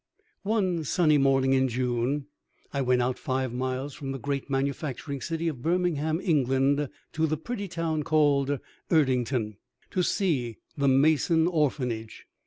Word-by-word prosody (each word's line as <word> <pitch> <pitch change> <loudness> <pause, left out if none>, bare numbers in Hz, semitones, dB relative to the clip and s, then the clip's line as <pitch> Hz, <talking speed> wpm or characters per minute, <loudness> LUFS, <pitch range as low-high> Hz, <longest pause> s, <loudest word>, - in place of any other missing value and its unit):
One 190 -6 0
sunny 155 0 +3
morning 135 -1 +3
in 130 0 +3
June, 125 +3 -1 0.5
I 140 - 0
went 125 -1 +2
out 125 +1 -1
five 130 -2 -2
miles 130 +2 -3
from 135 -1 -5
the - - -4
great 140 +1 -3
manufacturing 135 0 -2
city 165 +3 -2
of 145 -7 -3
Birmingham, 165 -1 0
England, 140 -3 +2 0.2
to 160 0 +1
the 155 0 -1
pretty 205 +4 -5
town 165 -3 -2
called 145 -2 +2 0.3
Erdington, 125 - +1 0.3
to 185 - +1
see 145 - 0 0.2
the 140 -2 +1
Mason 155 +4 +4
Orphanage. 130 -9 -1
140 Hz, 140 wpm, -27 LUFS, 130-160 Hz, 0.5 s, Mason